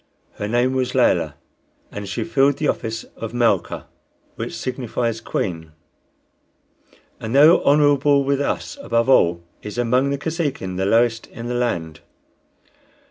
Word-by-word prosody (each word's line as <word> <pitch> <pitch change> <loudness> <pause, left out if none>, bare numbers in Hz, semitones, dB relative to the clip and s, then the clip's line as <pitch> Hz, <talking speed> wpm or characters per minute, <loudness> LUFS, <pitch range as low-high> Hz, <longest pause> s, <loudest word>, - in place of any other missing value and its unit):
Her 105 - -3
name 120 +3 +1
was 130 -1 -1
Layelah, - - +2 0.6
and 100 -1 -6
she 100 - -2
filled 140 -4 +2
the 150 - -1
office 115 -3 -2
of 115 +1 -6
Malca, 120 -1 +1 0.5
which - - -5
signifies 115 -3 -3
queen; 80 -7 -4 1.5
and 115 +3 -4
though 155 +5 +7
honorable 145 -1 +4
with 140 0 0
us 285 - -3
above 115 - 0
all, 85 -9 +4 0.2
is 105 +2 -8
among 125 +3 +2
the 140 - -1
Kosekin 140 - -3
the 95 +1 0
lowest 115 +1 +2
in 115 - -9
the 120 - -3
land. 85 -11 -2
120 Hz, 135 wpm, -21 LUFS, 110-140 Hz, 1.5 s, though